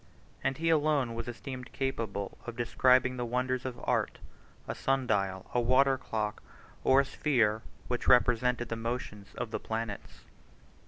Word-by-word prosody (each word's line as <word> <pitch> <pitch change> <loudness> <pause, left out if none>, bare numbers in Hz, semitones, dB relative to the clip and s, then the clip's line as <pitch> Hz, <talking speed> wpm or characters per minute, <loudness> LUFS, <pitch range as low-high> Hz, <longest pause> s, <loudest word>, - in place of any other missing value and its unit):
And 135 - 0
he 165 +1 +1
alone 150 -6 +2
was 115 +1 -5
esteemed 125 +1 -7
capable 115 -7 -3
of 120 - -5
describing 125 +2 +3
the 125 - -2
wonders 125 +2 -1
of 125 -2 -4
art, - - 0 0.5
a - - -2
sun 135 -1 0
dial, 95 -5 0
a 125 - +3
water 135 +3 +4
clock, 110 -4 -3 0.4
or 135 +1 +6
a - - -3
sphere 115 -7 +1 0.3
which 125 -1 -2
represented 125 -1 +4
the 115 - -2
motions 115 -3 -5
of 110 - -4
the - - -2
planets. 110 -2 -5
125 Hz, 155 wpm, -30 LUFS, 115-130 Hz, 0.5 s, or